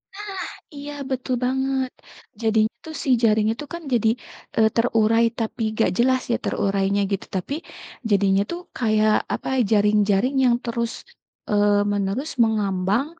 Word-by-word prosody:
Nah 415 Hz, +1 st, -7 dB, 0.5 s
iya, 290 Hz, +1 st, -7 dB, 0.2 s
betul 255 Hz, -1 st, -1 dB
banget, 265 Hz, 0 st, 0 dB, 0.5 s
jadinya 220 Hz, -1 st, +2 dB
tuh 320 Hz, -, -8 dB
si -, -, -4 dB
jaring 215 Hz, -1 st, +4 dB
itu 265 Hz, +6 st, -6 dB
kan 340 Hz, -, -6 dB
jadi, 230 Hz, -2 st, +3 dB, 0.5 s
eee, 220 Hz, -1 st, +5 dB
terurai 230 Hz, -1 st, +3 dB
tapi 225 Hz, 0 st, -3 dB
enggak 220 Hz, -3 st, +1 dB
jelas 260 Hz, +2 st, +3 dB
ya -, -, +3 dB
terurainya 195 Hz, 0 st, 0 dB
gitu, 195 Hz, -, -2 dB
tapi 185 Hz, +9 st, -3 dB, 0.6 s
jadinya 195 Hz, -1 st, +3 dB
tuh 345 Hz, -, -4 dB, 0.2 s
kayak, 215 Hz, -2 st, +3 dB, 0.2 s
apa, -, -, -5 dB, 0.2 s
jaring-jaring 210 Hz, +3 st, +3 dB
yang 240 Hz, -1 st, +4 dB
terus, 235 Hz, 0 st, -2 dB, 0.6 s
eee, 205 Hz, 0 st, +3 dB
menerus 205 Hz, +9 st, -1 dB
mengambang, 210 Hz, +2 st, +1 dB
220 Hz, 135 wpm, -23 LUFS, 205-255 Hz, 0.6 s, eee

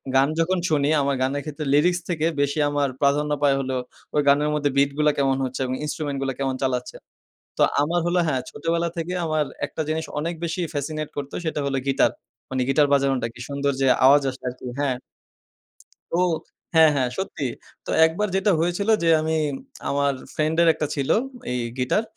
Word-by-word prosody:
গান 135 Hz, +1 st, +5 dB
যখন 180 Hz, +3 st, +2 dB
শুনি, 145 Hz, -1 st, +2 dB
আমার 140 Hz, 0 st, +1 dB
গানের 140 Hz, +2 st, 0 dB
ক্ষেত্রে 150 Hz, 0 st, -5 dB
লিরিক্স 175 Hz, +4 st, +3 dB
থেকে 160 Hz, -3 st, 0 dB, 0.2 s
বেশি 145 Hz, +2 st, 0 dB
আমার 145 Hz, -1 st, +1 dB
প্রাধান্য 145 Hz, +1 st, +2 dB
পায় 140 Hz, -1 st, +4 dB
হলো, 130 Hz, -1 st, -2 dB, 0.4 s
ওই 150 Hz, -, +4 dB
গানের 145 Hz, +2 st, +4 dB
মধ্যে 145 Hz, -1 st, +1 dB
বিট 140 Hz, 0 st, +4 dB
গুলা 150 Hz, 0 st, +4 dB
কেমন 135 Hz, -1 st, +2 dB
হচ্ছে 130 Hz, 0 st, -5 dB
এবং 130 Hz, 0 st, -2 dB
ইন্সট্রুমেন্ট 150 Hz, -2 st, -3 dB
গুলা 135 Hz, -1 st, -1 dB
কেমন 135 Hz, -1 st, -1 dB
চালাচ্ছে? 125 Hz, -2 st, -2 dB, 0.6 s
তো -, -, +4 dB, 0.2 s
আমার 170 Hz, +4 st, +1 dB
হলো 175 Hz, +1 st, +2 dB
হ্যাঁ, 130 Hz, -3 st, +1 dB
ছোটবেলা 170 Hz, +2 st, -1 dB
থেকে 170 Hz, +1 st, -3 dB
আমার 155 Hz, -2 st, +1 dB, 0.2 s
একটা 160 Hz, -, -4 dB
জিনিস 160 Hz, +1 st, -1 dB
অনেক 165 Hz, +3 st, -2 dB
বেশি 170 Hz, +2 st, -2 dB
ফ্যাসিনেট 155 Hz, +1 st, -3 dB
করতো, 145 Hz, -1 st, -5 dB
সেটা 155 Hz, -2 st, -1 dB
হলো 135 Hz, -1 st, 0 dB
গিটার। 135 Hz, -, +3 dB, 0.4 s
মানে 130 Hz, -1 st, 0 dB
গিটার 145 Hz, +2 st, +4 dB
বাজানোটা। 135 Hz, -4 st, +2 dB
কি -, -, -12 dB
সুন্দর 140 Hz, 0 st, 0 dB
যে 135 Hz, -, +3 dB, 0.2 s
আওয়াজ 140 Hz, +2 st, +7 dB
আসে 130 Hz, -, -12 dB
আরকি 125 Hz, 0 st, -8 dB
হ্যাঁ। 135 Hz, -3 st, +1 dB, 1.2 s
তো, -, -, 0 dB, 0.6 s
হ্যাঁ, 160 Hz, -1 st, +8 dB
হ্যাঁ। 130 Hz, -2 st, +1 dB
সত্যি। 190 Hz, -7 st, -3 dB, 0.4 s
তো -, -, -9 dB, 0.2 s
একবার 175 Hz, +6 st, 0 dB
যেটা 195 Hz, +2 st, +3 dB
হয়েছিল 175 Hz, +5 st, 0 dB
যে, 165 Hz, -, +3 dB
আমি 160 Hz, +1 st, 0 dB, 0.5 s
আমার 140 Hz, 0 st, +1 dB, 0.2 s
ফ্রেন্ডের 160 Hz, +2 st, +2 dB
একটা 150 Hz, -, -2 dB
ছিল, 140 Hz, -2 st, -2 dB, 0.4 s
এই 125 Hz, -, -1 dB, 0.2 s
গিটার, 130 Hz, -, +1 dB
145 Hz, 180 wpm, -23 LUFS, 135-160 Hz, 1.2 s, হ্যাঁ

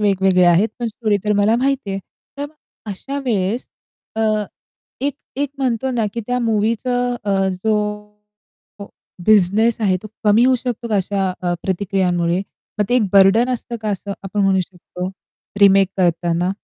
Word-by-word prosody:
वेगवेगळे 190 Hz, -3 st, +3 dB
आहेत." 175 Hz, +5 st, +4 dB
पण 240 Hz, -, -2 dB
स्टोरी 215 Hz, -1 st, 0 dB
तर 210 Hz, -, +2 dB
मला 220 Hz, +3 st, +3 dB
माहितीये. 255 Hz, -7 st, -1 dB, 0.4 s
तर 285 Hz, -, -2 dB
मग 305 Hz, -, -20 dB, 0.4 s
अशा 275 Hz, +9 st, -5 dB
वेळेस 215 Hz, 0 st, -1 dB, 0.5 s
अ, 225 Hz, -, 0 dB, 0.8 s
एक-एक 280 Hz, 0 st, -3 dB
म्हणतो 260 Hz, -1 st, 0 dB
नाकी 230 Hz, -2 st, -1 dB
त्या 250 Hz, 0 st, 0 dB
मूव्हीचं 235 Hz, +3 st, 0 dB
अ, 195 Hz, -1 st, +1 dB, 0.2 s
जो 220 Hz, -1 st, +3 dB, 1.5 s
बिझनेस 215 Hz, +2 st, +4 dB
आहे 195 Hz, -4 st, +2 dB
तो 215 Hz, -, -8 dB, 0.2 s
कमी 215 Hz, +3 st, +5 dB
होऊ 260 Hz, 0 st, +4 dB
शकतो 240 Hz, -1 st, -4 dB
का 210 Hz, -, +1 dB
अशा 195 Hz, 0 st, 0 dB
अ, 175 Hz, -1 st, 0 dB
प्रतिक्रियांमुळे? 180 Hz, -2 st, 0 dB, 0.4 s
मग 210 Hz, -, +3 dB
ते 245 Hz, -, +2 dB
एक 245 Hz, -, +3 dB
बर्डन 200 Hz, +5 st, +5 dB
असतं 235 Hz, 0 st, -6 dB
का 215 Hz, -, -2 dB
असं 200 Hz, 0 st, -4 dB
आपण 195 Hz, +1 st, -3 dB
म्हणू 190 Hz, -1 st, +3 dB
शकतो 180 Hz, 0 st, -6 dB, 0.5 s
रिमेक 195 Hz, -1 st, +6 dB
करताना? 175 Hz, 0 st, +1 dB
205 Hz, 150 wpm, -19 LUFS, 190-235 Hz, 1.5 s, रिमेक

